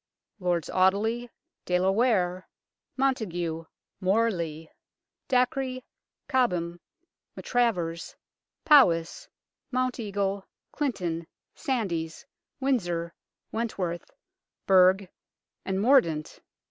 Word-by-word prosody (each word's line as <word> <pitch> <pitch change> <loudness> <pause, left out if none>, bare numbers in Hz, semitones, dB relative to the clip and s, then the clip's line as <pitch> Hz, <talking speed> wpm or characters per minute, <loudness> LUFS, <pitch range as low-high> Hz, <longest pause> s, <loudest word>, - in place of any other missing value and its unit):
Lords 175 -3 0
Audeley, 215 +6 +1 0.4
De 180 - +2
la 190 +1 +3
Ware, 190 -5 +1 0.5
Montague, 175 -12 -1 0.3
Morley, 185 -6 0 0.6
Dacre, 255 0 +1 0.5
Cobham, 175 -10 0 0.6
Maltravers, 180 -10 -1 0.5
Poms, 175 - +4 0.4
Mounteagle, 205 -6 -1 0.2
Clinton, 175 - -2 0.3
Sandys, 195 - -2 0.3
Windsor, 175 -11 -1 0.4
Went 230 0 -3
worth, 175 -2 -3 0.6
Burgh 190 0 +5 0.6
and 190 0 -1
Mordaunt. 200 - +3
195 Hz, 70 wpm, -27 LUFS, 170-245 Hz, 0.6 s, Burgh